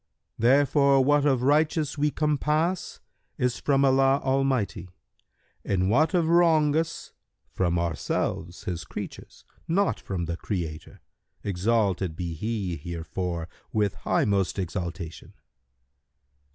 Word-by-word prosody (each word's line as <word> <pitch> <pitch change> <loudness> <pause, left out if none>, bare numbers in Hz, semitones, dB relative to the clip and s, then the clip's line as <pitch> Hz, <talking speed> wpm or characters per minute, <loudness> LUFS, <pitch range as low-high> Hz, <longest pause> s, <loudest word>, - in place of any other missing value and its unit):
Therefore 140 +2 +4
what 145 +1 +3
of 130 -3 +2
righteous 150 +1 +2
we 150 0 +1
compass 150 +4 0 0.4
is 125 -1 0
from 140 -1 +2
Allah 135 +1 +4
Almighty, 130 -9 0 0.7
and 95 0 0
what 155 - +3
of 170 -2 +3
wrongous 165 -1 +2 0.4
from 90 -2 0
ourselves[FN#135] 85 +1 -2
His 90 -2 -3
creatures, - - -9 0.2
not 195 +4 +1
from 90 -3 -4
the 85 0 -4
Creator, 85 -7 -5 0.4
exalted 100 -3 0
be 85 0 -4
He 100 -1 -3
herefor 85 +1 -4 0.3
with 105 -3 +1
highmost 100 -2 0
exaltation!" 85 -3 -5
115 Hz, 105 wpm, -26 LUFS, 90-145 Hz, 0.7 s, Therefore